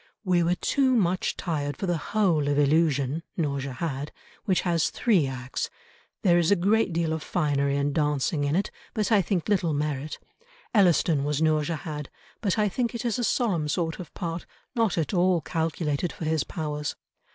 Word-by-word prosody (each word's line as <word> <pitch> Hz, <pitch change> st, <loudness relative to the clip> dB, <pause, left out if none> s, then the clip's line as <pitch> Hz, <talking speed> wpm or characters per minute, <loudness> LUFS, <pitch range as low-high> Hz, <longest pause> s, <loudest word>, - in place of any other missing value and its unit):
We 180 Hz, -2 st, +3 dB
were 170 Hz, +1 st, +2 dB
too 260 Hz, +5 st, +2 dB
much 185 Hz, -4 st, +1 dB
tired 145 Hz, -5 st, -2 dB
for -, -, -3 dB
the 175 Hz, -2 st, +1 dB
whole 175 Hz, -7 st, +1 dB
of 145 Hz, 0 st, +1 dB
Illusion 145 Hz, -1 st, +2 dB, 0.2 s
(Nourjahad), 140 Hz, -1 st, -2 dB, 0.4 s
which 185 Hz, -3 st, +2 dB
has 170 Hz, -3 st, +1 dB
three 195 Hz, -, +2 dB
acts; 130 Hz, -1 st, -4 dB, 0.5 s
there 175 Hz, -3 st, +5 dB
is 170 Hz, -, +2 dB
a 200 Hz, -, +6 dB
great 200 Hz, +3 st, +2 dB
deal 165 Hz, -1 st, 0 dB
of 160 Hz, -, -3 dB
finery 140 Hz, -5 st, 0 dB
and 140 Hz, 0 st, 0 dB
dancing 150 Hz, 0 st, +1 dB
in 145 Hz, +2 st, +1 dB
it, 195 Hz, -, 0 dB, 0.2 s
but 215 Hz, -1 st, 0 dB
I 210 Hz, -3 st, +6 dB
think 180 Hz, -2 st, -1 dB
little 180 Hz, -6 st, +2 dB
merit. 150 Hz, 0 st, -2 dB, 0.6 s
Elliston 175 Hz, -, +4 dB
was 145 Hz, 0 st, 0 dB
Nourjahad, 155 Hz, -1 st, 0 dB, 0.3 s
but 200 Hz, -1 st, 0 dB
I 210 Hz, -1 st, +3 dB
think 235 Hz, +4 st, -1 dB
it 235 Hz, -, -4 dB
is 235 Hz, -1 st, 0 dB
a -, -, 0 dB
solemn 195 Hz, -, +1 dB
sort 165 Hz, +3 st, -1 dB
of 175 Hz, -, -8 dB
part, 170 Hz, -1 st, -4 dB, 0.3 s
not 225 Hz, -7 st, +1 dB
at 165 Hz, +4 st, -1 dB
all 180 Hz, -1 st, +3 dB
calculated 160 Hz, -1 st, -1 dB
for 160 Hz, -, -6 dB
his 155 Hz, -2 st, +1 dB
powers. 150 Hz, -2 st, -4 dB
165 Hz, 175 wpm, -26 LUFS, 150-185 Hz, 0.6 s, a